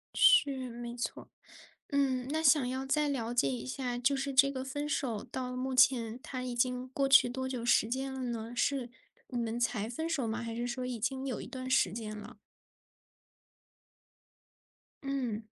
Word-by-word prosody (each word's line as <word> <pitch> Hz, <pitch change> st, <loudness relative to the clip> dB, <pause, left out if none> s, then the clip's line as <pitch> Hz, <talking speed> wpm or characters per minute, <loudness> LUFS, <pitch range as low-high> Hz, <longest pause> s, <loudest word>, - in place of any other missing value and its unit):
是， 275 Hz, -, +5 dB
没 240 Hz, 0 st, -7 dB
错 245 Hz, -, -4 dB
儿。 -, -, -25 dB, 0.6 s
嗯， 265 Hz, -3 st, +1 dB
那 315 Hz, +1 st, 0 dB
想 285 Hz, -3 st, +5 dB
要 260 Hz, +1 st, -3 dB
再 295 Hz, +2 st, +2 dB
了 240 Hz, -4 st, -2 dB
解 140 Hz, -, +3 dB
一 125 Hz, 0 st, -4 dB
下， 245 Hz, -, -3 dB
就 270 Hz, +3 st, +2 dB
是 275 Hz, +1 st, -2 dB
这 275 Hz, +1 st, +5 dB
个 260 Hz, -1 st, -4 dB
分 290 Hz, +2 st, -4 dB
手 235 Hz, -8 st, -1 dB
到 250 Hz, -1 st, -5 dB
目 260 Hz, +1 st, -2 dB
前 240 Hz, -2 st, +4 dB
它 255 Hz, -2 st, -5 dB
已 250 Hz, -1 st, -4 dB
经 250 Hz, +1 st, 0 dB
过 275 Hz, +1 st, 0 dB
去 270 Hz, -2 st, +7 dB
多 260 Hz, +1 st, -3 dB
久 250 Hz, -3 st, -4 dB
时 240 Hz, -, +4 dB
间 265 Hz, +2 st, -2 dB
了 265 Hz, -, -5 dB
呢， 235 Hz, -1 st, -4 dB
是 260 Hz, -2 st, 0 dB, 0.4 s
你 245 Hz, -, -3 dB
们 230 Hz, 0 st, -2 dB
才 225 Hz, -2 st, 0 dB
分 320 Hz, +7 st, -3 dB
手 280 Hz, -8 st, -1 dB
吗？ 220 Hz, +1 st, -2 dB
还 230 Hz, -1 st, -4 dB
是 240 Hz, +1 st, -2 dB
说 250 Hz, +1 st, -3 dB
已 245 Hz, -2 st, -4 dB
经 265 Hz, +4 st, -2 dB
有 250 Hz, -5 st, -3 dB
一 -, -, -7 dB
段 255 Hz, -1 st, -6 dB
时 190 Hz, -8 st, +3 dB
间 215 Hz, -1 st, -5 dB
了？ 210 Hz, +2 st, -10 dB, 2.7 s
嗯。 250 Hz, -6 st, -2 dB
250 Hz, 200 characters per minute, -31 LUFS, 235-270 Hz, 2.7 s, 去